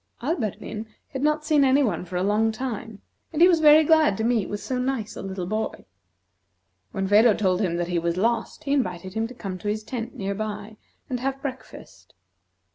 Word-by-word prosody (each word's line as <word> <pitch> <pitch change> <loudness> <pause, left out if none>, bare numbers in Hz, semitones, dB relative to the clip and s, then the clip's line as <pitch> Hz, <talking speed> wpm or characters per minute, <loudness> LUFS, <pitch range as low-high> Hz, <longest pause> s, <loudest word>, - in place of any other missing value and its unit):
Alberdin 225 - -3 0.2
had 265 - -5
not 300 +1 +1
seen 300 -2 +4
any 270 +2 +4
one 185 -8 -1
for 180 +1 -8
a 180 - +1
long 215 +3 +2
time, 225 -3 -6 0.3
and 315 - -3
he 350 - +8
was 345 -3 +4
very 305 0 +7
glad 310 -10 +4
to 220 - -1
meet 230 -3 +1
with 205 - -3
so 255 +3 -3
nice 250 -4 -2
a - - -6
little 190 -2 -4
boy. 215 +4 -3 1.1
When 195 -2 -2
Phedo 210 +2 +6
told 185 -2 +1
him 175 -4 0
that 175 0 -2
he 175 -1 +1
was 170 +1 -1
lost, 230 +8 -1
he 280 -2 0
invited 185 -8 -1
him 225 +1 -1
to 250 - -12
come 190 -6 -6
to 210 - -6
his 215 +1 -1
tent, 235 0 -5
near 200 0 -3
by, 210 +1 -5 0.3
and 250 -2 -3
have 270 +2 -2
breakfast. 265 -2 -9
220 Hz, 205 wpm, -25 LUFS, 195-265 Hz, 1.1 s, he